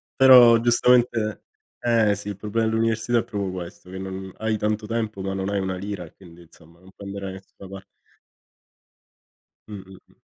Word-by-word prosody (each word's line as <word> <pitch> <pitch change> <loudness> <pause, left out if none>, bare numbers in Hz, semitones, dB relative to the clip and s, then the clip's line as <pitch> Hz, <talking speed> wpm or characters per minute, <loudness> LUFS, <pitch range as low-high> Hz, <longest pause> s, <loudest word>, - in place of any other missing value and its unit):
Però, 125 -3 +8
giustamente 120 -3 +2 0.4
eh, 115 -4 +2
sì, 105 +1 -8
il 100 - -5
problema 110 +2 -1
dell'università 115 +1 0
è - - -2
proprio 100 -2 -4
questo, 90 0 -9
che 95 - -8
non 95 0 -7
hai 110 -1 -1
tanto 105 +1 -2
tempo, 110 -3 -3
ma 95 0 -3
non 95 0 -3
hai 100 -1 -1
una 95 -1 -3
lira, 90 -3 -6
quindi, 85 -2 -17
insomma, 85 +1 -21
non 95 +1 -18
puoi 100 - -10
andare 100 0 -6
da 95 - -5
nessuna 95 0 -15
pa 95 0 -9 1.9
Mh-mh, 95 -2 -10
mh. - - -25
100 Hz, 175 wpm, -23 LUFS, 95-110 Hz, 1.9 s, Però